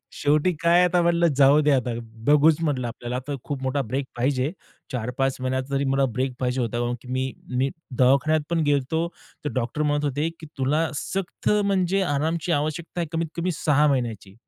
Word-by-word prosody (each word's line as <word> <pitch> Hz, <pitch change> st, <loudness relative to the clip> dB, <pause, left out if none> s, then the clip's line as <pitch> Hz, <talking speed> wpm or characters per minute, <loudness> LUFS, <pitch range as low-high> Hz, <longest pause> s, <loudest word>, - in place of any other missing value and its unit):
शेवटी 150 Hz, +5 st, +2 dB
काय 170 Hz, +1 st, +5 dB
आता 180 Hz, 0 st, +3 dB
म्हणलं 170 Hz, 0 st, +3 dB
जाऊ 140 Hz, +2 st, +6 dB
दे 150 Hz, 0 st, +2 dB
आता, 130 Hz, -2 st, +1 dB, 0.4 s
बघूच 150 Hz, +2 st, +5 dB
म्हंटलं 145 Hz, -6 st, 0 dB
आपल्याला 120 Hz, +1 st, -5 dB
आता 130 Hz, +3 st, -4 dB
खूप 140 Hz, -2 st, -4 dB
मोठा 130 Hz, +2 st, 0 dB
ब्रेक 135 Hz, +4 st, -2 dB
पाहिजे. 130 Hz, +3 st, 0 dB, 0.4 s
4-5 125 Hz, +2 st, -1 dB
महिन्यात 130 Hz, 0 st, -1 dB
तरी 140 Hz, 0 st, 0 dB
मला 135 Hz, 0 st, +2 dB
ब्रेक 130 Hz, 0 st, 0 dB
पाहिजे 125 Hz, 0 st, 0 dB
होता. 120 Hz, -1 st, -1 dB
कारण 120 Hz, 0 st, -1 dB
की -, -, -13 dB
मी, 130 Hz, 0 st, -1 dB, 0.2 s
मी 135 Hz, +2 st, +1 dB, 0.3 s
दवाखान्यात 140 Hz, +5 st, +4 dB
पण 170 Hz, -1 st, +1 dB
गेलो 145 Hz, +3 st, +1 dB, 0.4 s
तर 145 Hz, -, -1 dB
डॉक्टर 130 Hz, +4 st, -1 dB
म्हणत 145 Hz, 0 st, +1 dB
होते 145 Hz, +3 st, 0 dB
की 160 Hz, -, -9 dB
तुला 150 Hz, +5 st, +1 dB
सक्त 190 Hz, +5 st, -3 dB, 0.2 s
म्हणजे 195 Hz, -1 st, +1 dB
आरामची 160 Hz, +2 st, 0 dB
आवश्यकता 155 Hz, +3 st, -2 dB
आहे 170 Hz, -, -2 dB
कमीत 165 Hz, 0 st, 0 dB
कमी 175 Hz, +2 st, 0 dB
6 150 Hz, -1 st, +4 dB
महिन्याची. 115 Hz, -8 st, -1 dB
145 Hz, 180 wpm, -24 LUFS, 130-160 Hz, 0.4 s, जाऊ